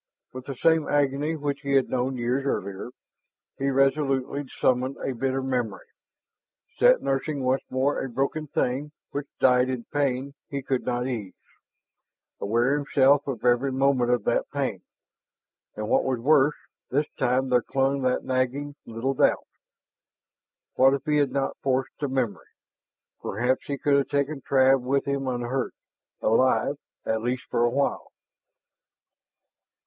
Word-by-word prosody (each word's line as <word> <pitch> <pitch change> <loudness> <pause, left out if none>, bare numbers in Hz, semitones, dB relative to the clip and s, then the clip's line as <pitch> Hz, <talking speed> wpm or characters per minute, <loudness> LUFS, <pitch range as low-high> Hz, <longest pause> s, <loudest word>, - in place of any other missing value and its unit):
With 130 0 -8
the 140 - -4
same 160 +3 +3
agony 145 +2 +1
which 145 -2 -3
he 140 -2 -2
had 135 -1 +4
known 130 +1 -1
years 125 +3 0
earlier, 100 -6 -3 0.7
he 135 +1 +1
resolutely 135 0 +1
summoned 130 +1 +1
a 135 - -3
bitter 130 +2 -1
memory, 125 -7 -2 0.9
sat - - +5
nursing 135 +1 -1
once 130 +1 +1
more 135 +2 0
a 135 - -4
broken 140 +5 -2
thing 140 +3 -1 0.2
which 145 0 -4
died 125 0 +4
in 125 -2 -3
pain 140 -1 0 0.2
he 140 -1 -4
could 130 -1 -2
not 125 0 0
ease, 115 -7 -4 1.0
aware 120 +7 +1
himself 140 -1 +3
of 125 -4 -4
every 125 +3 +3
moment 130 -2 +2
of 125 -1 +2
that - - 0
pain. - - -2 0.9
And 105 0 -4
what - - +3
was 130 -1 0
worse, 145 +3 +4 0.3
this 145 +4 +1
time 130 +1 +1
there 125 -1 +4
clung 135 +2 0
that 130 -1 0
nagging 130 +3 -1
little 115 +4 -2
doubt. - - +2 1.3
What 135 +1 +5
if 140 - -6
he 150 -1 +2
had 145 -3 +2
not 135 0 -1
forced 130 -1 0
the 145 - -1
memory? 120 - -2 0.7
Perhaps 125 +6 -1
he 140 - -2
could 140 0 +2
have 140 -2 +1
taken 140 0 -1
Trav 135 0 +4
with 135 +2 0
him 140 -1 -2
unhurt, 125 +1 -2 0.5
alive, 130 +5 +2 0.3
at 110 0 0
least 125 +2 -2
for 120 - +2
a 120 - +4
while. 140 +3 -1
135 Hz, 150 wpm, -26 LUFS, 125-140 Hz, 1.3 s, sat